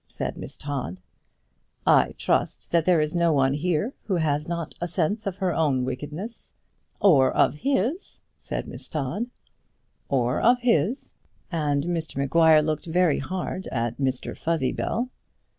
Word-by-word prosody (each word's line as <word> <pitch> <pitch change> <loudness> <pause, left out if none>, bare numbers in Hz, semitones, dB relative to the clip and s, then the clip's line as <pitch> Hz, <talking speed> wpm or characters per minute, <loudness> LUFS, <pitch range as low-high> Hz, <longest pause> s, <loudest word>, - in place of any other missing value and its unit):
said - - -4
Miss - - -8
Todd. 135 - -4 0.9
"I - - +4
trust - - 0
that 170 -2 +3
there 180 -3 +4
is 150 +2 -1
no 170 -1 +3
one 135 -2 +3
here 175 - 0
who 195 - 0
has 150 -3 0
not 170 -1 -3
a 175 - -1
sense 190 +5 -1
of 190 - -2
her 185 -2 0
own 140 -6 +1
wickedness." 150 - -6 0.5
"Or 140 -10 +5
of - - +3
his," 270 - -1 0.2
said - - -4
Miss - - -8
Todd. 160 - -2 0.8
"Or 125 -3 +1
of 245 +2 +5
his," 235 - +1 0.4
and 145 -4 0
Mr 165 -2 -3
Maguire 155 +3 +5
looked 155 +1 -2
very 170 -2 +2
hard 185 +5 -4
at 120 0 -2
Mr 130 -2 -1
Fuzzybell. 165 - -1
160 Hz, 145 wpm, -25 LUFS, 140-185 Hz, 0.9 s, Or